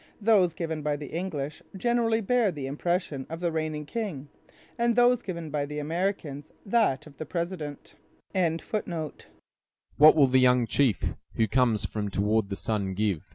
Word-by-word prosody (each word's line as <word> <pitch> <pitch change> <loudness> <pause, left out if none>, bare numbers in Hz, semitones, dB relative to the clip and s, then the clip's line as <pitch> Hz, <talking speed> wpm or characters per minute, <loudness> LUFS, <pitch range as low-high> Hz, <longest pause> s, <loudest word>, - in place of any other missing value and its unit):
Those 200 -6 +4
given 160 -2 -3
by 150 0 0
the 145 0 -8
English 160 -5 -4 0.2
generally 230 +1 +1
bear 230 -1 +2
the 145 -5 -5
impression 150 -1 -2
of 165 +1 -5
the 170 -1 0
reigning 155 -1 -2
king, 160 - -4 0.5
and 235 -1 +1
those 245 0 +4
given 170 -7 -6
by 145 -1 -1
the 150 +1 -6
Americans 155 -2 -3
that 205 - +2
of 145 -3 -15
the 155 - -5
president. 170 -4 -4 0.4
"What 165 -3 0
will 145 -3 +6
the 130 0 +3
young 125 -1 +4
chief, 115 - +1 0.2
who 110 - +2
comes 115 -2 +2
from 105 -1 -3
toward 105 +1 +1
the 100 - -3
sun, 100 -4 -1
give?" 100 -5 -1
155 Hz, 155 wpm, -27 LUFS, 135-185 Hz, 0.5 s, will